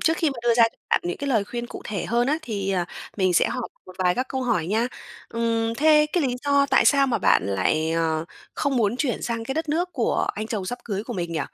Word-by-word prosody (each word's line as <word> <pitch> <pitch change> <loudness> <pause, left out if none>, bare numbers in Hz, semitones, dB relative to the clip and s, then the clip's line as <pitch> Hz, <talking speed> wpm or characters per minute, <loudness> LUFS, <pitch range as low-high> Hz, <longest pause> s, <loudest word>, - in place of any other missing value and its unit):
Trước 325 +1 +2
khi 320 -4 +1
mà 270 - -7
đưa 235 -1 +3
ra 230 - +5
cho - - -29
bạn - - +4
những 175 - -2
cái 280 - -4
lời 220 -6 +2
khuyên 240 +3 -5
cụ - - -9
thể 200 -4 -3
hơn 240 +2 +1
á 300 +4 +1
thì, 200 -6 -3
ờ, 180 -2 0 0.3
mình 185 -2 +2
sẽ - - +4
hỏi 250 -2 -3 0.2
một 185 - -11
vài 180 -1 +2
các 255 - -1
câu 265 -1 -2
hỏi 215 -10 0
nha. 220 +5 +1 0.4
Ừm. 230 -1 0
Thế 300 +2 +5
cái 350 - +2
lý 255 -3 0
do 280 -1 +3
tại - - +4
sao 275 -1 +5
mà 245 - 0
bạn - - +4
lại, 130 +12 +1
ờ, 160 -1 0 0.3
không 280 -3 0
muốn 225 -1 +1
chuyển 260 -3 -1
sang 230 -1 -2
cái 265 - -3
đất 320 +1 -2
nước 350 +4 0
của - - 0
anh 215 +1 -4
chồng 210 -5 -3
sắp 245 +3 -4
cưới 205 -2 -3
của 245 - -5
mình 170 -4 -3
nhỉ? 160 - -1
230 Hz, 270 wpm, -24 LUFS, 190-270 Hz, 0.4 s, ra